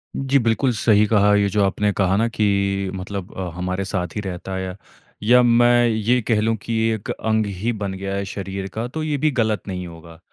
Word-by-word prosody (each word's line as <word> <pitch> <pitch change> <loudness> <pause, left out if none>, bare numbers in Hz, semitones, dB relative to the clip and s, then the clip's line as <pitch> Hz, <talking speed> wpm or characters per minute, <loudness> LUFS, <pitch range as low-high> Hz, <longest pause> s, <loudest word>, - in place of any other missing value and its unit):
जी, 135 +1 +2
बिल्कुल 115 +2 +1
सही 105 -1 +3
कहा, 105 -1 +4
ये 100 0 +3
जो 105 +1 +1
आपने 105 +1 +1
कहा 95 -1 +1
ना 115 +2 +2
कि 100 -3 0
मतलब 95 +1 -6
अ, 95 -2 -3
हमारे 90 +2 -3
साथ 90 -4 -3
ही 105 - -2
रहता 95 -1 -5
है 95 - -3
या 90 - -6 0.5
या 125 +3 +6
मैं 120 0 +4
ये 115 +3 +1
कह 110 -1 +1
लूँ 115 +1 +1
कि 115 - -4 0.2
एक 110 -2 -6
अंग 110 -1 0
ही 115 +5 0
बन 100 -3 -4
गया 95 +1 -4
है 100 - -2
शरीर 95 0 -5
का 115 +2 -3
तो 155 +5 -5
ये 150 -2 -1
भी 155 +2 +1
गलत 110 -3 +1
नहीं 90 -2 -4
होगा। 85 0 -13
105 Hz, 220 wpm, -21 LUFS, 95-115 Hz, 0.5 s, या